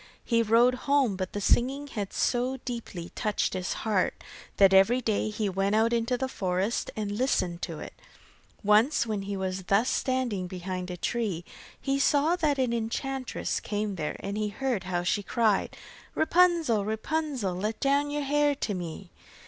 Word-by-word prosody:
He 230 -2 +3
rode 230 +3 +4 0.2
home, 275 -8 +3
but 185 -1 -4
the 205 - -2
singing 265 +7 +2
had 210 -8 -5
so 250 +2 0
deeply 225 -8 -5
touched 210 -2 -1
his 185 -1 -2
heart, 205 -4 +1 0.4
that 195 -1 +6
every 195 +6 +5
day 215 -3 0
he 210 0 -2
went 195 +2 0
out 225 +2 +3
into 235 +1 +1
the 265 +2 -1
forest 190 -2 -1
and 210 -2 -3
listened 205 -7 0
to - - -4
it. - - -8 0.7
Once 215 +7 +4
when 215 -3 -2
he 200 0 -4
was 190 -1 -3
thus 200 +6 +2
standing 250 -8 -1
behind 185 0 -5
a 180 - -5
tree, 195 -4 -2 0.3
he 275 0 0
saw 295 +4 +3
that 300 -5 +1
an 255 -3 +1
enchantress 255 +3 -2
came 210 -1 -2
there, 155 -5 -3
and 200 +2 -3
he 215 - 0
heard 230 -1 -2
how 175 -1 -1
she 185 +3 +1
cried: 215 0 +1 0.4
'Rapunzel, 330 - +3
Rapunzel, 235 - -2
Let 210 +5 -3
down 280 +1 +2
your 295 0 -2
hair 290 +1 +2
to 225 -6 -2
me. 175 0 -6
220 Hz, 170 wpm, -28 LUFS, 195-260 Hz, 0.7 s, that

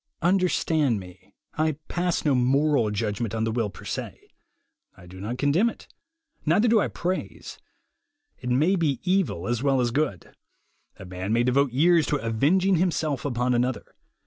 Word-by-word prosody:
Understand 165 - +2
me, 95 +1 -14 0.2
I 155 0 +2
pass 175 -1 -1
no 145 - +3
moral 135 -1 +2
judgment 105 +1 -2
on 110 - -1
the 115 - 0
will 115 -2 -1
per 95 - -13
se. - - -5 0.8
I 90 - -14
do 90 +1 -12
not 110 +5 -4
condemn 150 - +2
it, - - -12 0.6
neither 185 +9 +3
do 225 -1 +4
I - - +1
praise. 185 +2 -5 0.8
It 125 - -5
may 150 +10 +3
be 155 -7 0
evil 185 - 0
as 120 -1 -1
well 135 -1 +2
as 120 -1 +1
good. 135 - -2 0.6
A 95 - -10
man 90 +2 -5
may 120 +1 +3
devote 130 +2 +2
years 160 +5 +3
to - - +1
avenging 155 - +2
himself 160 -6 -1
upon 125 -2 0
another. 125 -2 -2
135 Hz, 165 wpm, -25 LUFS, 115-165 Hz, 0.8 s, do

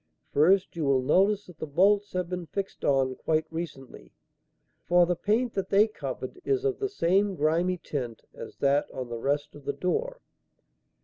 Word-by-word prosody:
First, 185 +7 +3
you 165 - -2
will 135 -2 +2
notice 200 +8 +3
that 180 -3 -15
the 155 - -4
bolts 200 +7 +3
have 180 -1 -1
been 180 -1 -5
fixed 195 +2 -5
on 135 -2 +2
quite 160 0 0
recently, 160 -5 -7 0.8
for 175 0 +5
the 180 +1 0
paint 225 +6 0
that 195 -1 -3
they 205 +2 +5
covered 370 +10 -6
is 405 +1 0
of 410 -2 0
the 400 - -1
same 195 - +1
grimy 170 +4 +1
tint 125 -9 -5
as - - -9
that 140 +1 +2
on 125 -2 -6
the 120 -1 -5
rest 145 +4 -1
of 145 - -13
the - - -2
door. - - -2
180 Hz, 180 wpm, -27 LUFS, 145-200 Hz, 0.8 s, for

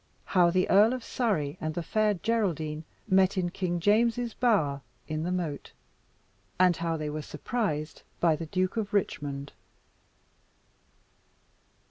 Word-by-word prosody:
How 180 -3 +4
the 185 +1 +2
Earl 210 +5 +5
of 255 -2 -4
Surrey 180 - -1
and 155 0 -3
the 175 - -2
Fair 215 +4 +1
Geraldine 170 -8 -1 0.2
met 190 0 +3
in 175 -1 0
King 175 -2 -2
James's 230 +4 +2
Bower 160 - +1 0.3
in 155 0 -2
the 175 +3 -2
Moat 170 -6 -3 0.9
And 180 -1 +5
how 165 0 -2
they 150 -1 -3
were 155 +1 -4
surprised 155 - -3 0.2
by 165 -2 +4
the 165 +1 -6
Duke 185 +5 -1
of 210 -1 -2
Richmond. 140 -7 -2
180 Hz, 135 wpm, -28 LUFS, 155-210 Hz, 0.9 s, Earl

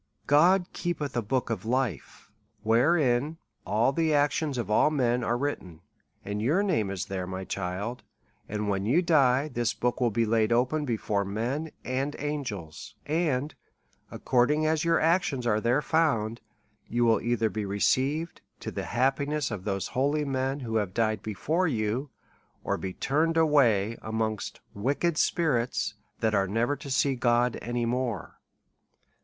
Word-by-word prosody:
God 175 +6 +5
keepeth 160 -7 -3
a 120 - +1
book 120 +3 -1
of 105 -5 -3
life, 115 - -3 0.3
wherein 130 +4 +2 0.3
all 110 +5 +2
the 160 +1 +1
actions 145 -1 +1
of 110 -4 -3
all 130 - +4
men 125 -5 +1
are 120 +1 0
written; 95 - -4 0.4
your 115 - +1
name 110 - +1
is 95 -2 -3
thefe, 95 -2 -4
my 95 0 -5
child, 100 +6 -4 0.5
and 105 0 -2
when 100 0 -1
you 160 +10 +3
die, 140 -4 +3
this 120 -5 -1
book 125 +1 -1
will 120 - +3
be 115 +2 +1
laid 110 0 +2
open 130 +6 +1
before 110 -4 -1
men 120 +11 -3 0.2
and 135 +3 -2
angels, 130 - -5
and 150 -3 0 0.6
according 145 +5 +1
as 155 +1 +1
your 170 0 +3
actions 160 -6 +1
are 110 -2 +2
there 125 +6 +2
found, 120 -9 +1 0.5
you 120 +1 +1
will 115 -1 +3
either 115 -2 0
be 110 - -3
received 135 +11 0 0.2
to - - -5
the - - -4 0.2
happi 135 +3 +2
ness 150 -4 -1
of 100 -3 -5
those 95 -3 -2
holy 145 +3 0
men 135 +1 -1
who 115 -3 -1
have 100 -4 -2
died 110 -1 +1
before 155 - -1
you, 120 +1 -1 0.5
or - - 0
be 95 - -4
turned 160 - 0
away 120 -9 +3
amongst 110 -1 -3
wicked 140 +10 0
spirits, 130 -10 +1 0.3
that 110 -1 +1
are 95 -2 +2
never 115 +8 0
to 140 0 -9
see 135 +1 +2
God 120 -1 +1
any 120 0 -2
more. 120 -6 -3
125 Hz, 155 wpm, -28 LUFS, 110-145 Hz, 0.6 s, God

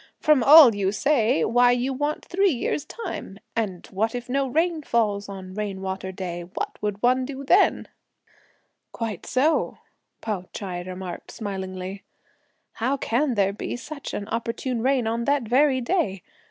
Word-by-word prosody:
"From 305 -4 +4
all 285 -3 +9
you 195 -1 0
say, 230 - +2
why 245 +1 +4
you 250 +2 -1
want 290 +3 -2
three 390 +2 +2
years' 285 0 -1
time! 300 - -7 0.2
and 205 -6 -2
what 220 +5 -1
if 245 0 -5
no 275 +1 +1
rain 325 +4 +1
falls 210 -6 0
on 190 -1 -8
'rain 205 -2 -4
water' 190 0 -4
day! 180 -2 -5
What 175 +1 -6
would 210 0 -3
one 255 +1 +3
then 275 0 +2
do?" - - -23 1.0
"Quite 220 -6 -5
so!" 290 +5 +1 0.4
Pao 205 -5 -3
Ch'ai 180 -3 -5
remarked 185 -1 -7
smilingly; 190 -2 -5 0.7
"how 260 +4 -1
can 260 +1 0
there 200 -1 +2
be 205 - -4
such 285 +4 -7
an 200 - -4
opportune 230 +1 -2
rain 260 -1 +2
on 230 +1 -1
that 285 -2 +2
very 260 +3 +3
day! 235 - -1
230 Hz, 155 wpm, -24 LUFS, 195-270 Hz, 1.0 s, all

